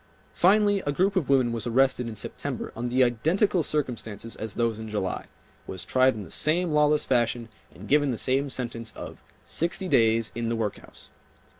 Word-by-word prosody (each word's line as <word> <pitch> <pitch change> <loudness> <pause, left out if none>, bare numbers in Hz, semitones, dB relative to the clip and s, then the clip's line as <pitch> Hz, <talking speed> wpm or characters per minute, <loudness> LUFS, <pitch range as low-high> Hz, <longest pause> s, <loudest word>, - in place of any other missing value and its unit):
Finally 205 +2 +4
a - - +2
group 190 +7 +1
of 175 -8 0
women 130 -3 +3
was 115 +1 -2
arrested 130 0 +2
in 115 - -6
September - - -4
under 120 +2 -3
the 130 +2 +3
identical 165 - +2
circumstances 115 -7 -3
as 110 -1 -5
those 115 -2 0
in 110 0 -7
July, 105 -3 -3 0.4
was 95 - -5
tried 130 0 +3
in 105 - -6
the 80 - -12
same 170 +2 +1
lawless 150 0 +3
fashion 120 -2 0 0.2
and 100 +4 -12
given 145 0 +3
the 120 - -1
same 135 +4 0
sentence 115 -3 -4
of - - -9 0.2
"sixty 175 +3 -1
days 115 -6 +3
in 115 0 -3
the 115 - 0
workhouse." 110 -2 -5
125 Hz, 180 wpm, -26 LUFS, 115-150 Hz, 0.4 s, Finally